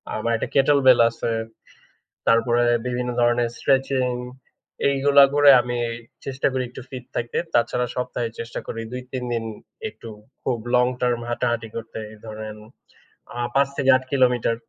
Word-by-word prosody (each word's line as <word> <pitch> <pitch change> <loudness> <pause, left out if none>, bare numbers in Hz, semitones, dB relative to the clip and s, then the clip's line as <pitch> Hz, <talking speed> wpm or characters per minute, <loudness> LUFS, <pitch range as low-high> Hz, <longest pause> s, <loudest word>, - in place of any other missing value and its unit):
আমার 115 +2 -1
একটা - - -3
Kettle 140 +1 +5
bell 125 - +8
আছে। 115 - -5 1.0
তারপরে 120 +1 +3 0.2
বিভিন্ন 125 0 -2
ধরনের 120 0 +2
স্ট্রেচিং, 135 -1 +1 0.8
এইগুলা 140 +1 +5
করে 145 -1 +7
আমি 120 0 -3 0.5
চেষ্টা 135 0 -1
করি 130 -1 -1
একটু 130 - -9
ফিট 125 -2 -7
থাকতে। 120 0 -2 0.2
তাছাড়া 125 +1 +2
সপ্তাহে 125 -2 -2
চেষ্টা 115 0 -5
করি 115 - -5
২-৩ 125 0 -5
দিন 115 -1 -1 0.4
একটু 110 +2 -12 0.3
খুব 125 -3 -1 0.2
লং 125 0 +5
টার্ম 120 -1 +1
হাঁটাহাঁটি 120 -1 -1
করতে, 115 -1 -6
এই 110 - -14
ধরেন 110 0 -7 0.8
আ - - -6 0.2
৫ 140 0 +4
থেকে 135 - +1
৮ 130 - -10
কিলোমিটার। 125 -4 +2
125 Hz, 145 wpm, -23 LUFS, 115-130 Hz, 1.0 s, bell